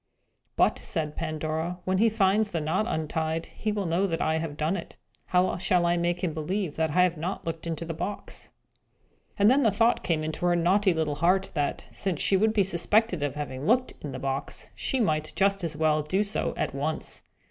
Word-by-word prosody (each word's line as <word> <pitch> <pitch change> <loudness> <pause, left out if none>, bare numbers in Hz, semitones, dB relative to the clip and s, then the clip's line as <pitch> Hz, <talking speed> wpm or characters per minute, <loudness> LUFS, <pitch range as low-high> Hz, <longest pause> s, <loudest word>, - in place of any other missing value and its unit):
"But," - - +3
said 155 -4 -3
Pandora, 160 +2 -2
"when 185 0 +1
he 225 +2 +5
finds 210 0 +2
the 170 - -2
knot 165 +8 0
untied, 160 -2 -1
he 215 - -1
will 205 -2 -2
know 175 +4 +1
that 165 -3 -2
I 160 0 +1
have 155 -2 -5
done 155 +5 0
it. - - -7 0.3
How 180 0 +2
shall 180 -2 +2
I 170 0 +3
make 175 +1 -1
him 170 -4 0
believe 165 +2 -2
that 160 0 +1
I 180 +5 +4
have 180 -2 +1
not 175 +5 -4
looked 165 0 -4
into 165 0 -3
the 165 - -4
box?" 180 +5 -5 0.9
And 200 - +5
then 265 +5 +5
the 230 - +4
thought 230 +4 +2
came 160 -3 0
into 155 +3 -2
her 175 - +3
naughty 190 +4 +3
little 155 -2 -1
heart, 190 +3 +3
that, 145 -3 -1
since 185 -6 -2
she 195 - +2
would 215 +3 +3
be 210 -2 +3
suspected 190 +1 +1
of 145 -1 -1
having 145 -1 -4
looked 250 +3 +3
into 145 -3 -6
the - - -4
box, 135 +1 -4
she 265 - -1
might 155 -8 0
just 195 -1 +2
as 160 -3 -3
well 155 -1 +2
do 185 +7 0
so 205 0 -2
at - - -1
once. - - -3
170 Hz, 215 wpm, -27 LUFS, 155-195 Hz, 0.9 s, he